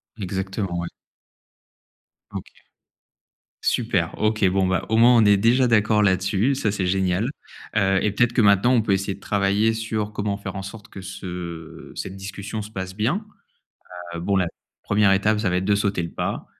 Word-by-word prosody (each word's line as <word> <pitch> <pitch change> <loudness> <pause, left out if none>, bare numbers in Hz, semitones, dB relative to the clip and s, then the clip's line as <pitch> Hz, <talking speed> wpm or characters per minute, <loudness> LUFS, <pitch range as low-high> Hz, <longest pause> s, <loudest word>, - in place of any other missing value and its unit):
Exactement, 95 -2 -3
ouais. 85 - -3 1.4
OK, - - -6 1.1
super 100 -9 +1
OK, 110 -1 +1
bon, 95 0 +1
bah 90 -1 0
au 110 - +2
moins 120 +2 +7
on 115 - +6
est 100 -1 +6
déjà 120 +5 +3
d'accord 105 -2 +3
là-dessus, 100 +6 +2
ça 105 -6 0
c'est 100 -3 -2
génial. 95 +4 +1 0.5
Heu, 95 -2 +3
et 105 - +2
peut-être 120 +3 +2
que 120 - +3
maintenant 100 +4 +5
on 115 - +4
peut 105 - -1
essayer 95 0 0
de - - -18
travailler 100 +2 +1
sur 110 -1 -3
comment 100 -1 -2
faire 100 - -7
en 95 - -4
sorte 105 +2 -10
que 95 - -9
ce 85 -3 -7
cette 95 - -5
discussion 100 +2 -6
se 105 +1 -9
passe 95 -2 -5
bien. 135 - 0 0.9
Heu, 85 - -4
bon 100 +3 0
la 90 -2 +2 0.4
1re 105 -1 +3
étape 105 +2 +2
ça 105 -4 0
va 90 - +1
être 95 - -1
de 100 +1 +3
sauter 100 -3 0
le 85 - -5
pas. - - -3
100 Hz, 185 wpm, -23 LUFS, 95-110 Hz, 1.4 s, moins